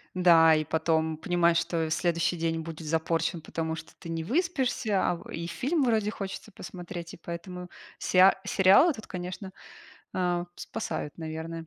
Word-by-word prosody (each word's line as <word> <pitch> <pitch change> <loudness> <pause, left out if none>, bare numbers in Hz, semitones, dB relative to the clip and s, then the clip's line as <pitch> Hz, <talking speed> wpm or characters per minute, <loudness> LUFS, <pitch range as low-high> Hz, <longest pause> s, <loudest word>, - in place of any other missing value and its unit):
Да, 165 -3 +6
и 155 - 0
потом 160 0 +1
понимаешь, 170 0 +2
что 165 -2 0
следующий 170 +2 +1
день 165 -1 -1
будет 160 0 -8
запорчен, 165 +1 0
потому 160 +1 -3
что 160 0 -10
ты 170 - -10
не 165 -1 -3
выспишься, 260 - +1
а 175 - +1
в - - -12
и 170 +1 -4
фильм 280 - 0
вроде 220 -3 +1
хочется 195 -3 -6
посмотреть, 175 -1 -8
и - - -10
поэтому 180 +1 -7 0.3
сеа 185 +1 +5
сериалы 205 - +5
тут, 220 -3 -10
конечно, 185 +1 -6 0.6
а, 175 -1 0
спасают, 155 -2 -5
наверно. 160 +1 -5
170 Hz, 155 wpm, -28 LUFS, 165-190 Hz, 0.6 s, Да